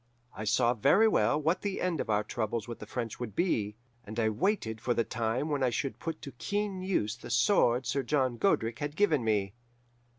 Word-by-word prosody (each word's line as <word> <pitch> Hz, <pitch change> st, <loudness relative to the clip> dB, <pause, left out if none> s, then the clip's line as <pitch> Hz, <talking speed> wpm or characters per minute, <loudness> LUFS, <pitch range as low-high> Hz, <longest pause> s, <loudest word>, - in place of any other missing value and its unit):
I 110 Hz, -, -5 dB
saw 120 Hz, +3 st, +3 dB
very 190 Hz, -, +4 dB
well 150 Hz, -7 st, +2 dB
what 160 Hz, +4 st, +1 dB
the 200 Hz, -2 st, -2 dB
end 180 Hz, -4 st, 0 dB
of -, -, -6 dB
our 105 Hz, 0 st, +2 dB
troubles 110 Hz, 0 st, -3 dB
with 120 Hz, -1 st, -7 dB
the -, -, -9 dB
French 115 Hz, -3 st, -4 dB
would 115 Hz, -5 st, -5 dB
be, 105 Hz, -, 0 dB, 0.3 s
and 110 Hz, +1 st, -6 dB
I 110 Hz, -1 st, +3 dB
waited 110 Hz, -, -1 dB
for 120 Hz, -, 0 dB
the 115 Hz, -, +2 dB
time 115 Hz, +5 st, -1 dB
when 145 Hz, -2 st, -1 dB
I 130 Hz, -, +3 dB
should 135 Hz, +3 st, -3 dB
put 165 Hz, -1 st, -5 dB
to 140 Hz, -, -6 dB
keen 200 Hz, +7 st, -3 dB
use 175 Hz, -, 0 dB
the -, -, -11 dB
sword 125 Hz, -, +3 dB
Sir 135 Hz, +4 st, 0 dB
John 130 Hz, -2 st, 0 dB
Godric 115 Hz, -, +1 dB
had 145 Hz, 0 st, -3 dB
given 160 Hz, -, +3 dB
me. 100 Hz, -3 st, 0 dB
125 Hz, 210 wpm, -30 LUFS, 110-160 Hz, 0.3 s, very